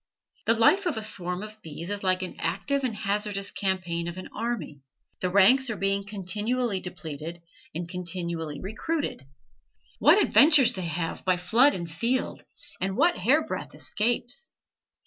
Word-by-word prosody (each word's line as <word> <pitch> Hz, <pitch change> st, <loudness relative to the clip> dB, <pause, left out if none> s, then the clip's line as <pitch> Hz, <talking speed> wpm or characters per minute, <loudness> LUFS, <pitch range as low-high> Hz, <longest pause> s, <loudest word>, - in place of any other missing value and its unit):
The 230 Hz, -, +4 dB
life 365 Hz, -, +4 dB
of 315 Hz, -, -1 dB
a 220 Hz, -, -2 dB
swarm 180 Hz, -3 st, -3 dB
of 215 Hz, 0 st, -10 dB
bees 165 Hz, +2 st, -7 dB
is 205 Hz, 0 st, -3 dB
like 185 Hz, 0 st, +1 dB
an 185 Hz, -, -6 dB
active 235 Hz, +12 st, -1 dB
and 245 Hz, -4 st, -1 dB
hazardous 205 Hz, -1 st, -1 dB
campaign 175 Hz, -3 st, -2 dB
of 170 Hz, +1 st, -6 dB
an 185 Hz, -, -8 dB
army; 215 Hz, -11 st, -4 dB, 0.4 s
the 185 Hz, -, -1 dB
ranks 235 Hz, +8 st, +5 dB
are 220 Hz, -, -3 dB
being 195 Hz, 0 st, +1 dB
continually 210 Hz, +3 st, -1 dB
depleted, 165 Hz, -2 st, -7 dB, 0.4 s
and 170 Hz, +1 st, -3 dB
continually 170 Hz, -4 st, -3 dB
recruited. 220 Hz, -, -3 dB, 0.7 s
What -, -, +6 dB
adventures 295 Hz, -, +6 dB
they 185 Hz, -2 st, -4 dB
have 165 Hz, +1 st, -3 dB
by 185 Hz, -1 st, +2 dB
flood 230 Hz, +11 st, +4 dB
and 175 Hz, -2 st, -4 dB
field, 235 Hz, +11 st, -2 dB, 0.4 s
and 190 Hz, +1 st, -2 dB
what 345 Hz, +1 st, +4 dB
hair -, -, +3 dB
breadth -, -, -6 dB
escapes! 240 Hz, -, -1 dB
195 Hz, 155 wpm, -27 LUFS, 175-230 Hz, 0.7 s, What